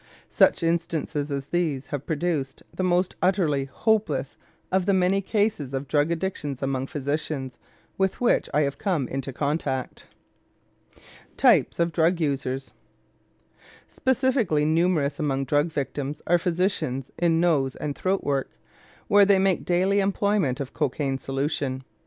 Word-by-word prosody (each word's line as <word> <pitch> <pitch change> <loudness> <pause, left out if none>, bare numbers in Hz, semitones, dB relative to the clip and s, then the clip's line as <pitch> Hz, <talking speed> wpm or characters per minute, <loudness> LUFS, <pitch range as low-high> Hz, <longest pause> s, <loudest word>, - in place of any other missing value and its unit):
Such - - +4
instances 165 -3 -1
as 140 0 -4
these 155 -6 -1
have 145 0 -5
produced 155 -4 -2
the - - -2
most 180 0 +1
utterly 170 -7 +2
hopeless 150 - 0 0.4
of 190 0 +1
the 200 - +4
many 190 +1 +2
cases 205 - -1
of 135 +1 -4
drug 145 +2 +2
addictions 160 -6 -3
among 135 -1 -1
physicians 145 -2 -3 0.4
with 190 -1 +1
which 245 - +2
I 150 - +2
have 140 0 -3
come 175 - 0
into 135 0 -4
contact. 140 -1 -3 1.3
TYPES - - +4
OF 170 0 +2
DRUG 165 +2 +2
USERS 135 -3 -2 1.2
Specially 255 - +1
numerous 160 -3 +1
among 135 -2 0
drug 145 +4 +2
victims 145 -1 -4
are 175 +1 +3
physicians 170 -7 -1
in 165 -2 +3
nose 150 -7 +2
and 145 -2 -4
throat 190 +1 -1
work, 140 -2 -1 0.6
where 205 0 +6
they 200 0 +5
make 190 -1 +1
daily 185 +3 +2
employment 195 -7 +1
of 135 -2 -5
cocaine 135 -2 -1
solution. 135 -1 -2
155 Hz, 135 wpm, -25 LUFS, 135-180 Hz, 1.3 s, where